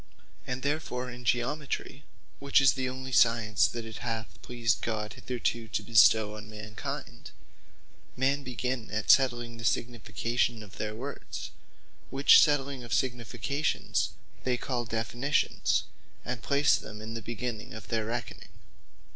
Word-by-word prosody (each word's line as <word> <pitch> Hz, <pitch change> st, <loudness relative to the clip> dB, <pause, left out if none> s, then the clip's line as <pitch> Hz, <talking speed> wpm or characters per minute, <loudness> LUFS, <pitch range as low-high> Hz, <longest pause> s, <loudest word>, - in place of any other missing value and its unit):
And 130 Hz, 0 st, -3 dB
therefore 140 Hz, -4 st, -2 dB
in 125 Hz, 0 st, -10 dB
Geometry, 135 Hz, +4 st, -1 dB, 0.4 s
(which 140 Hz, 0 st, +4 dB
is 135 Hz, -1 st, +6 dB
the 130 Hz, -1 st, -2 dB
onely 130 Hz, +1 st, -6 dB
Science 115 Hz, -4 st, +4 dB
that 115 Hz, -1 st, -5 dB
it 110 Hz, -1 st, -8 dB
hath 115 Hz, -2 st, -5 dB
pleased 120 Hz, -2 st, 0 dB
God 105 Hz, -2 st, -2 dB
hitherto 120 Hz, -2 st, -2 dB
to -, -, -2 dB
bestow 110 Hz, -2 st, +5 dB
on 105 Hz, 0 st, -9 dB
mankind,) 105 Hz, 0 st, -7 dB, 0.9 s
men 135 Hz, +2 st, +2 dB
begin 125 Hz, -2 st, -3 dB
at 110 Hz, -1 st, +3 dB
settling 120 Hz, -3 st, +3 dB
the 115 Hz, -, -8 dB
significations 120 Hz, 0 st, 0 dB
of 100 Hz, -1 st, -13 dB
their 110 Hz, 0 st, -3 dB
words; 135 Hz, +5 st, -6 dB, 0.6 s
which 135 Hz, +2 st, +7 dB
settling 140 Hz, -3 st, +2 dB
of 115 Hz, -2 st, -1 dB
significations, 130 Hz, +4 st, -1 dB, 0.3 s
they 125 Hz, -1 st, +1 dB
call 120 Hz, -1 st, -2 dB
Definitions; 120 Hz, +5 st, 0 dB, 0.4 s
and 120 Hz, -2 st, -3 dB
place 140 Hz, 0 st, +3 dB
them 105 Hz, -, -9 dB
in 110 Hz, +1 st, -6 dB
the 115 Hz, -, -4 dB
beginning 120 Hz, -1 st, -5 dB
of 110 Hz, -, -10 dB
their 110 Hz, -2 st, 0 dB
reckoning. 120 Hz, -1 st, -5 dB
120 Hz, 140 wpm, -29 LUFS, 110-130 Hz, 0.9 s, which